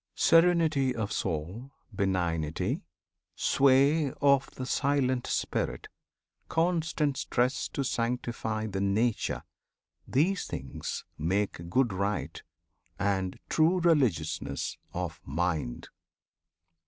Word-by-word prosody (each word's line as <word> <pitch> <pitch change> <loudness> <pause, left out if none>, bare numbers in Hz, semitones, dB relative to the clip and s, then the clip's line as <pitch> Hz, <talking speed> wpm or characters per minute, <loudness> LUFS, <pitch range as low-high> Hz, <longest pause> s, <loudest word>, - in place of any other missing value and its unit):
Serenity 165 -6 +4
of 110 -3 -2
soul, 90 - -3 0.2
benignity, 85 -6 -1 0.5
Sway 140 +2 +4
of 140 -1 +3
the 130 - -4
silent 130 -2 +1
Spirit, - - -2 0.6
constant 160 -4 +1
stress 125 +2 0
To 140 - -3
sanctify 115 -3 -2
the 95 -3 -3
Nature, 105 +4 0 0.6
these 180 +8 +1
things 65 0 -5
make 85 0 -1
Good 120 +1 +2
rite, 100 +2 -2 0.6
and 95 -2 -1
true 165 +3 +3
religiousness 85 - +1 0.2
of 90 -3 -4
Mind. 80 -4 -2
120 Hz, 90 wpm, -29 LUFS, 90-140 Hz, 0.6 s, Serenity